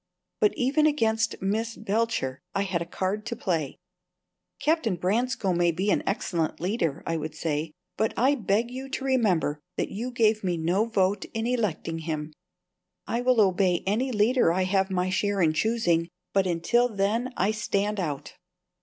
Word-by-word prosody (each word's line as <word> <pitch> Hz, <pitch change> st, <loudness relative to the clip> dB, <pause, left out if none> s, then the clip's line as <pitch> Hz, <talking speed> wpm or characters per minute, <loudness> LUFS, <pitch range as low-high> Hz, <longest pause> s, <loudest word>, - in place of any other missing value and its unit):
But 210 Hz, -, +3 dB
even 290 Hz, +5 st, +3 dB
against 225 Hz, -6 st, +1 dB
Miss 225 Hz, +4 st, -1 dB
Belcher 215 Hz, -, -1 dB, 0.2 s
I 200 Hz, -, +2 dB
had 185 Hz, -3 st, -1 dB
a 170 Hz, -, -4 dB
card 190 Hz, +4 st, -2 dB
to 235 Hz, -, -3 dB
play. 165 Hz, -, -2 dB, 0.8 s
"Captain 300 Hz, -, +1 dB
Branscome 200 Hz, +1 st, 0 dB
may 175 Hz, 0 st, +4 dB
be 190 Hz, +5 st, 0 dB
an -, -, +2 dB
excellent 170 Hz, -5 st, -1 dB
leader," 170 Hz, -5 st, -1 dB
I 165 Hz, -, -1 dB
would 155 Hz, 0 st, -5 dB
say; 155 Hz, 0 st, -2 dB, 0.2 s
"but 220 Hz, +1 st, +1 dB
I 265 Hz, +4 st, +4 dB
beg 225 Hz, -1 st, 0 dB
you 265 Hz, +1 st, -6 dB
to 265 Hz, 0 st, -4 dB
remember 195 Hz, -, +2 dB, 0.2 s
that -, -, -1 dB
you 235 Hz, +5 st, -3 dB
gave 220 Hz, -3 st, +2 dB
me 180 Hz, -2 st, 0 dB
no 175 Hz, +7 st, +1 dB
vote 200 Hz, -3 st, +1 dB
in 225 Hz, 0 st, -1 dB
electing 210 Hz, -9 st, -1 dB
him. 155 Hz, -1 st, -4 dB, 0.7 s
I 235 Hz, -, -1 dB
will 250 Hz, -1 st, +3 dB
obey 185 Hz, -3 st, +3 dB
any 230 Hz, +7 st, 0 dB
leader 220 Hz, -3 st, +3 dB
I 185 Hz, +2 st, +1 dB
have 190 Hz, +1 st, +1 dB
my 185 Hz, 0 st, 0 dB
share 205 Hz, +1 st, 0 dB
in 160 Hz, -3 st, +3 dB
choosing, 175 Hz, -4 st, +1 dB, 0.2 s
but 195 Hz, -1 st, +3 dB
until 235 Hz, +9 st, +2 dB
then 220 Hz, +4 st, 0 dB
I 195 Hz, +3 st, +2 dB
stand 210 Hz, -1 st, -1 dB
out." 150 Hz, -6 st, -4 dB
200 Hz, 170 wpm, -26 LUFS, 175-230 Hz, 0.8 s, may